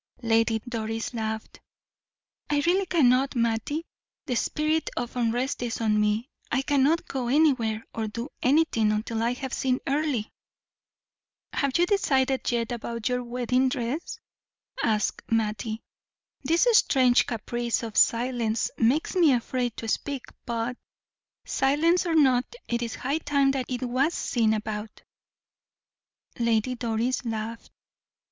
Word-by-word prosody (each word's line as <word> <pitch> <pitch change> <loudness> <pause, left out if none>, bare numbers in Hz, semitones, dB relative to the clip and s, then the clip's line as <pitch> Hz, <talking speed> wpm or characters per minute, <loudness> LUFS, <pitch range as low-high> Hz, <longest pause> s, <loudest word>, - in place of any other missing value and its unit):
Lady 225 0 +2
Doris 225 0 -3
laughed. 220 -1 -4 0.9
"I 290 -1 +1
really 370 +2 +2
cannot, 270 -5 +3
Mattie. 235 +7 0 0.4
The 255 -5 -1
spirit 305 +6 0
of 240 0 -3
unrest 245 +3 0
is 235 -2 -3
on 215 -2 +2
me, 210 +3 +1 0.2
I 260 +2 +1
cannot 290 +4 +2
go 255 -3 -3
anywhere 245 -6 +2
or 225 -1 -2
do 235 +6 -5
anything 255 -6 +3
until 220 +1 -2
I 235 +2 +1
have 260 +1 -6
seen 255 -1 +1
Earle." 280 -5 0 1.3
"Have 275 -2 +1
you 350 - +4
decided 270 -11 +1
yet 235 -1 -1
about 235 -1 -3
your 250 0 -1
wedding 250 +2 +1
dress?" 255 +4 -3 0.6
asked 215 -2 0
Mattie. 220 0 -1 0.6
"This 330 - +3
strange 255 - +4
caprice 240 +1 -2
of 225 -2 -6
silence 235 -2 +2
makes 255 +11 +2
me 340 -5 +5
afraid 245 -1 -1
to 225 - -5
speak; 275 +3 -2 0.2
but, 235 +1 -2 0.7
silence 320 +7 +2
or 330 - +1
not, 260 -5 +4 0.2
it 235 0 -1
is 235 -1 -3
high 280 +5 -1
time 280 -3 +2
that 265 -2 -2
it 255 0 -3
was 260 +7 +1
seen 220 -3 +1
about." 215 0 -5 1.4
Lady 235 +1 +1
Doris 235 +1 -1
laughed. 225 0 -5
245 Hz, 130 wpm, -26 LUFS, 225-275 Hz, 1.4 s, me